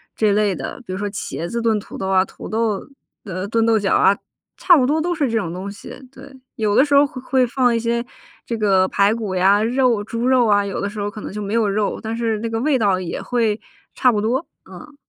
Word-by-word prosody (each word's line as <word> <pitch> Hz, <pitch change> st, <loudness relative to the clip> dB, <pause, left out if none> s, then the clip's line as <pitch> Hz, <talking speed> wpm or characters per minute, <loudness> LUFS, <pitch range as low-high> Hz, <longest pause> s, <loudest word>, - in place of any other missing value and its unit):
这 215 Hz, -2 st, +2 dB
类 205 Hz, -2 st, +2 dB
的。 -, -, -6 dB
比 185 Hz, -, -6 dB
如 -, -, -3 dB
说 205 Hz, +1 st, -3 dB
茄 180 Hz, -4 st, -5 dB
子 235 Hz, 0 st, -2 dB
炖 225 Hz, -2 st, +2 dB
土 -, -, -10 dB
豆 190 Hz, -, -3 dB
啊， 190 Hz, -1 st, +3 dB
土 -, -, -10 dB
豆 220 Hz, -2 st, -1 dB, 0.4 s
呃， 185 Hz, -1 st, -4 dB
炖 225 Hz, +1 st, +1 dB
豆 225 Hz, -1 st, +3 dB
角 200 Hz, -2 st, 0 dB
啊， 200 Hz, -, +4 dB, 0.4 s
差 355 Hz, -3 st, +5 dB
不 255 Hz, -, +3 dB
多 310 Hz, +4 st, +1 dB
都 350 Hz, +1 st, -1 dB
是 285 Hz, -6 st, 0 dB
这 225 Hz, -, 0 dB
种 165 Hz, -6 st, -2 dB
东 190 Hz, +2 st, -5 dB
西， 200 Hz, -, -11 dB, 0.2 s
对。 275 Hz, +1 st, -13 dB, 0.2 s
有 210 Hz, -2 st, 0 dB
的 270 Hz, -, +5 dB
时 285 Hz, -1 st, +1 dB
候 285 Hz, -, +6 dB
会 260 Hz, -2 st, -8 dB
会 260 Hz, -1 st, +2 dB
放 245 Hz, -1 st, +1 dB
一 -, -, +2 dB
些 235 Hz, +1 st, -1 dB, 0.4 s
这 235 Hz, -, -3 dB
个 190 Hz, -3 st, +3 dB
排 200 Hz, +3 st, +2 dB
骨 210 Hz, -5 st, -4 dB
呀， 195 Hz, +3 st, +4 dB
肉 240 Hz, -1 st, +2 dB
猪 230 Hz, +2 st, -3 dB
肉 255 Hz, -2 st, +4 dB
啊， 205 Hz, -1 st, +3 dB
有 195 Hz, -, -4 dB
的 200 Hz, -, -2 dB
时 210 Hz, 0 st, -6 dB
候 205 Hz, -, -2 dB
可 215 Hz, -, -9 dB
能 -, -, -6 dB
就 210 Hz, -, -5 dB
没 205 Hz, +1 st, -4 dB
有 225 Hz, -2 st, +2 dB
肉， 200 Hz, +1 st, -1 dB
但 225 Hz, +1 st, -4 dB
是 225 Hz, -2 st, -1 dB
那 230 Hz, +1 st, -3 dB
个 225 Hz, -, -2 dB
味 275 Hz, -2 st, +2 dB
道 200 Hz, -3 st, +2 dB
也 185 Hz, -2 st, -5 dB
会 225 Hz, -3 st, 0 dB, 0.3 s
差 255 Hz, -, +3 dB
不 210 Hz, -3 st, +1 dB
多， 250 Hz, +9 st, -1 dB, 0.2 s
嗯。 300 Hz, -2 st, -12 dB
220 Hz, 275 characters per minute, -20 LUFS, 200-245 Hz, 0.4 s, 候